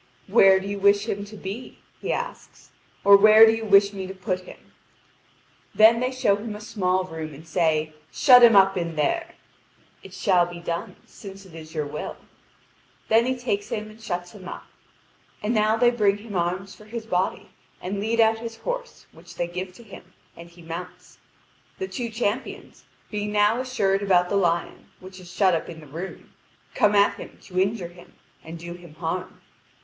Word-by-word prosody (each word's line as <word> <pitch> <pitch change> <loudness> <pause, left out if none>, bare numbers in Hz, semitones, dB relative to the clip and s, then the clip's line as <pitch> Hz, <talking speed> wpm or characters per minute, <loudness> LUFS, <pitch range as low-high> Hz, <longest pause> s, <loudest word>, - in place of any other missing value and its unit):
"Where 190 -1 +5
do 190 - -8
you 200 0 -4
wish 200 +2 +3
him 200 -2 -3
to 210 +1 -12
be?" 200 +6 -7 0.2
he - - -3
asks, 485 +1 -6 0.3
"or 200 0 +8
where 215 +2 +8
do 220 - +5
you 225 0 -3
wish 200 -1 +4
me 190 -1 -5
to 190 - -8
put 185 -1 -3
him?" - - -15 1.0
Then 225 +2 +6
they 250 +1 0
show 230 -6 +1
him 210 0 -6
a - - -8
small 185 -4 -1
room, 160 -4 -7
and 160 +4 -14
say: 155 -2 0 0.2
"Shut 250 -3 +7
him 235 -2 +7
up 195 0 +5
in 170 -3 -3
there." 335 - -1 0.7
"It - - -12
shall 180 -5 +2
be 175 0 -9
done, 170 0 -5
since 195 -1 -12
it 185 - -16
is 160 0 -11
your 150 -1 -1
will." 145 +1 -6 0.9
Then 230 +2 +4
he 260 0 -1
takes 220 -5 -3
him 215 0 -4
and 220 +1 -17
shuts 175 -4 -4
him 190 -4 -12
up. - - -8 0.8
And 215 +3 0
now 215 0 +2
they 240 +1 +4
bring 205 -4 +2
him 205 -1 -10
arms 180 +3 -2
for 210 - -16
his 225 +1 -7
body, 185 -3 -2 0.3
and 195 +2 -4
lead 225 +3 -1
out 225 0 +4
his 230 0 -7
horse, - - -6
which - - -15
they 175 - -1
give 180 +2 -6
to 235 - -15
him, 185 -3 -14 0.2
and 170 0 -12
he 170 0 -17
mounts. 180 +2 -9 0.6
The 380 - -4
two 245 -8 -4
champions, 225 +2 -4 0.3
being 210 -1 -3
now 210 +3 +2
assured 205 -7 0
about 180 -3 +2
the - - -1
lion, 170 -3 -1
which 185 0 -12
is 180 -1 -12
shut 185 0 +3
up 165 - -2
in 165 -2 -9
the 155 - -13
room, 165 +7 -9 0.4
come 210 0 +3
at 200 0 +3
him - - -10
to 185 -2 -4
injure 195 -2 -1
him 175 0 -17 0.3
and 165 +1 -8
do 170 +1 -8
him 175 -3 -14
harm. 175 +3 -5
195 Hz, 195 wpm, -24 LUFS, 175-220 Hz, 1.0 s, or